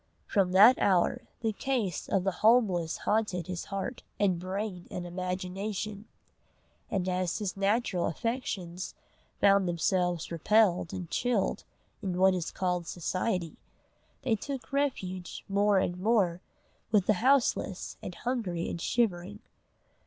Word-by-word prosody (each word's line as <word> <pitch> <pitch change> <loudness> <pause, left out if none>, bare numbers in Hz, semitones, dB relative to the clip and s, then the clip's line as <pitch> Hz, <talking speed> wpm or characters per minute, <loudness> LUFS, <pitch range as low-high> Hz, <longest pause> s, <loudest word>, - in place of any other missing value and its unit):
From 195 -3 +1
that 215 +7 +8
hour 185 -3 +2
the 225 -2 0
case 230 -5 -2
of 190 - +2
the 195 - +1
homeless 205 -8 +3
haunted 210 -5 +1
his 180 0 -5
heart 195 +5 -4 0.2
and 190 -4 +2
brain 185 0 -4
and 180 - -5
imagination; 190 +4 -4 0.8
and 190 -2 -1
as 180 -2 0
his 205 -4 -3
natural 195 -2 +1
affections 185 - -3 0.5
found 200 -2 +5
themselves 175 0 0
repelled 180 0 +3
and 180 -2 -5
chilled 240 -5 0 0.4
in 185 -4 -2
what 190 +1 +5
is 180 -3 -2
called 180 -2 -2
Society, 180 0 -2 0.7
they 230 - +2
took 270 +4 -6
refuge 190 -11 -2
more 200 0 +3
and 180 -1 0
more 190 -4 +2 0.5
with 205 -4 +4
the 215 - +4
houseless 255 -7 +2
and 180 - -6
hungry 215 -9 -2
and 170 - -4
shivering. 205 -4 0
190 Hz, 130 wpm, -29 LUFS, 180-215 Hz, 0.8 s, that